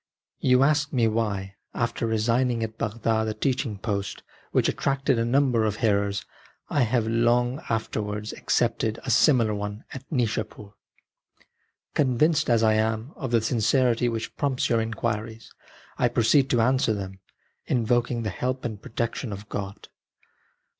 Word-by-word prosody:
You 125 0 +4
ask 150 +1 +2
me 120 -4 +2
why, 100 -3 -2 0.2
after 115 0 -1
resigning 115 +2 +1
at 110 0 -4
Bagdad 110 0 0
a 110 - -2
teaching 125 -2 -1
post 100 -1 -3 0.3
which - - +2
attracted 135 -2 0
a 115 - +1
number 125 -2 +2
of 105 -2 0
hearers, 100 -2 0 0.5
I 145 - +2
have, 115 -1 +1
long 120 +4 +2
afterwards, 105 -1 -2
accepted 115 -2 0
a 130 - -2
similar 120 -3 +4
one 105 +1 -5
at 135 - -7
Nishapur. 110 -5 -2 1.2
Convinced 150 +3 +2
as 115 -1 +3
I 110 -1 +4
am 110 +4 0
of 130 - -4
the 115 -1 +3
sincerity 120 +1 +2
which 115 -1 -4
prompts 140 -3 0
your 115 -1 +3
inquiries, 110 0 -4 0.5
I 125 - +4
proceed 120 +4 +3
to 120 - +3
answer 125 -2 +2
them, 95 -1 -6 0.5
invoking 120 0 +1
the 110 - -2
help 130 +7 -3
and 110 -4 -4
protection 115 +1 -3
of 100 +1 -8
God. 100 -1 -6
115 Hz, 145 wpm, -25 LUFS, 110-125 Hz, 1.2 s, You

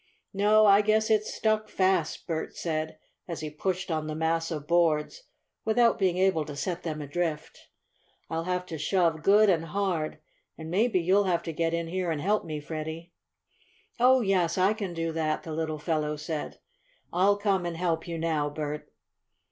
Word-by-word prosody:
"No, 210 +2 +4
I 200 0 +7
guess 215 +1 +2
it's 215 0 +2
stuck 215 -1 0
fast," 185 -4 0
Bert 160 -1 -4
said, 155 -1 -3 0.3
as 170 -3 -5
he 155 -1 -5
pushed 185 +4 -2
on 155 -1 -1
the 155 - -4
mass 165 +1 0
of 150 -4 -4
boards 170 - +1 0.4
without 230 +1 +3
being 185 -3 +2
able 185 -4 +2
to 145 -1 -7
send 175 +4 -3
them 155 -3 -4
adrift. 155 +1 -4 0.6
"I'll 165 0 -3
have 180 0 -1
to 165 -4 -6
shove 165 0 +1
good 210 +5 +5
and 165 -4 +2
hard, 175 -4 -2 0.4
and 160 0 -7
maybe 215 +1 +2
you'll 190 +4 +3
have 175 -3 +1
to 165 - -5
get 165 +1 0
in 170 0 -2
here 180 +1 -2
and 160 -2 -1
help 205 +7 +1
me, 155 -2 -4
Freddie." 160 +3 -6 0.9
"Oh, 255 +1 +5
yes, 190 -5 +1
I 190 +3 +4
can 200 -5 -5
do 165 0 -2
that!" 160 -1 -1
the 160 - -6
little 155 -1 -2
fellow 150 -1 -1
said. 150 0 -5 0.6
"I'll 195 +3 +3
come 195 -3 0
and 170 -1 -4
help 165 -2 -1
you 170 -1 -4
now, 160 -3 0
Bert." 150 0 -5
170 Hz, 180 wpm, -28 LUFS, 160-195 Hz, 0.9 s, I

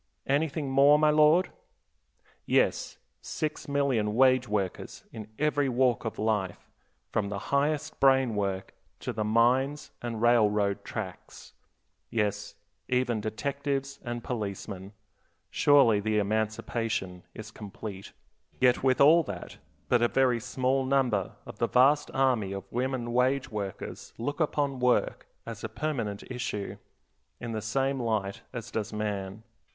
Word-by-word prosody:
Anything 145 +1 0
more, 140 +2 +6
my 150 0 +4
lord? 155 +4 +4 1.0
Yes, - - +1 0.2
six 155 -1 -4
million 135 -7 +1
wage 130 0 +4
workers 100 -3 -3
in 110 -2 -7
every 145 -2 +1
walk 125 -1 +1
of 110 - -4
life, 105 -5 -2 0.4
from 100 - -1
the 100 - -3 0.2
highest 150 +2 0
brain 135 -3 +4
work 100 -2 -2 0.3
to - - -3
the 110 - -2
mines 130 +6 +2
and 115 -2 -4
railroad 105 -4 +3
tracks; - - -8 0.6
yes, 105 -3 -2 0.3
even 125 -3 0
detectives 140 +5 -3
and 120 -1 -5
policemen. 100 -3 -5 0.6
Surely 135 -7 +5
the 105 +1 0
emancipation 110 -2 -1
is 110 0 -8
complete. 105 -2 -8 0.5
Yet 125 -1 +4
with 130 -1 +2
all 155 +5 +7
that, 90 -3 -8 0.3
but 120 -1 +3
a 120 - +4
very 125 -1 +2
small 130 +3 0
number 130 -7 +1
of - - -11
the - - +2
vast 140 +4 +4
army 125 -7 +1
of 100 - -5
women 125 -1 -2
wage 130 +2 +1
workers 100 -3 -6
look 145 +7 -3
upon 145 -4 0
work 125 0 +1 0.2
as - - -8
a - - -3
permanent 115 -10 -3
issue, 125 -5 -4 0.6
in 115 - -5
the 110 -1 -3
same 135 +5 0
light 110 -5 -2
as 120 -4 -7
does 110 0 -3
man. 105 -1 -4
120 Hz, 135 wpm, -28 LUFS, 105-135 Hz, 1.0 s, all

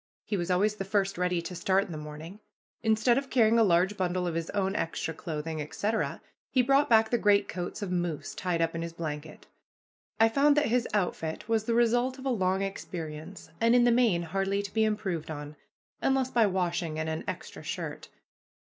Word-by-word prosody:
He 210 - -2
was 175 -2 -2
always 205 +4 +2
the 195 - -2
first 195 0 0
ready 180 -1 0
to 180 - -6
start 190 +3 +1
in 190 - -10
the - - -5
morning. 150 +6 -9 0.4
Instead 220 +3 +3
of 275 -1 -9
carrying 230 -2 +4
a - - +6
large 185 +1 +3
bundle 180 -1 0
of 175 - -1
his 165 0 -3
own 195 -1 -1
extra 165 -3 -2
clothing, 160 -1 -4
etc., 210 +9 -2 0.3
he 255 - +3
brought 275 +3 +3
back 220 -1 +5
the 240 - +2
greatcoats 200 -1 +1
of 190 - -4
moose 175 -4 -2
tied 175 -2 -1
up 165 - -1
in 165 - -3
his 170 0 -5
blanket. 155 -2 -6 0.7
I 225 - +7
found 285 +5 +3
that 295 - +4
his 240 +1 +1
outfit 180 -4 -2
was 225 -1 +1
the 230 - +1
result 240 +2 +2
of 265 - -10
a - - +1
long 190 -4 +1
experience, 165 -3 -6
and 230 +1 +5
in 245 - +6
the 240 - +5
main 230 -8 +3
hardly 195 +4 -1
to 200 - -7
be 220 -1 +3
improved 200 -7 -2
on, 150 -1 -6 0.5
unless 265 -1 +1
by 230 -3 +4
washing 175 -4 -1
and 160 0 -2
an 160 0 -3
extra - - -6
shirt. - - -5
195 Hz, 200 wpm, -29 LUFS, 170-225 Hz, 0.7 s, I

